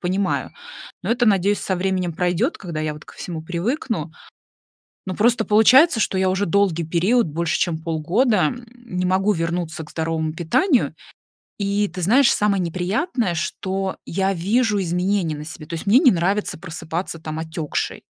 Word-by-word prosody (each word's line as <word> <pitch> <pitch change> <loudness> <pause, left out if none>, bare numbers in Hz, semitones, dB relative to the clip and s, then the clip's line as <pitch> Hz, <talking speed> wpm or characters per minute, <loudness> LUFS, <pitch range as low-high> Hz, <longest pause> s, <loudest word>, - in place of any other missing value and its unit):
понимаю, 190 +2 -1 0.5
но - - -2
это, 240 0 +2
надеюсь, 200 0 +3
со 190 - -1
временем 180 -2 -1
пройдет, 180 - 0
когда 170 -5 -5
я 155 -1 -2
вот 150 - -12
ко - - -14
всему 165 -3 -6
привыкну. 180 - -2 1.0
Ну, 185 - -4
просто 230 +1 +3
получается, 235 +7 +5
что 195 - 0
я 190 0 +2
уже 190 +2 0
долгий 170 -3 +1
период, 185 +7 +2
больше 165 +2 -1
чем 170 -3 0
полгода, 180 - +1
м, 240 +5 -6
не 230 -7 -4
могу 190 +3 +2
вернуться 165 -1 -3
к - - -13
здоровому 160 -1 -2
питанию. 235 - +1 0.6
И 200 +1 +1
ты 185 -1 -7
знаешь, 240 +8 +4
самое 200 -2 +1
неприятное, 190 - -1
что 190 +3 -3
я 195 +2 0
вижу 205 +3 +1
изменения 180 -1 0
на 150 - -7
себе. 155 -1 -9
То 170 - -8
есть, 165 - -6
мне 225 +7 +6
не 275 - +6
нравится 190 +3 0
просыпаться, 165 0 -5
там, 155 0 -6
отекшей. 160 -1 -3
185 Hz, 165 wpm, -21 LUFS, 165-210 Hz, 1.0 s, мне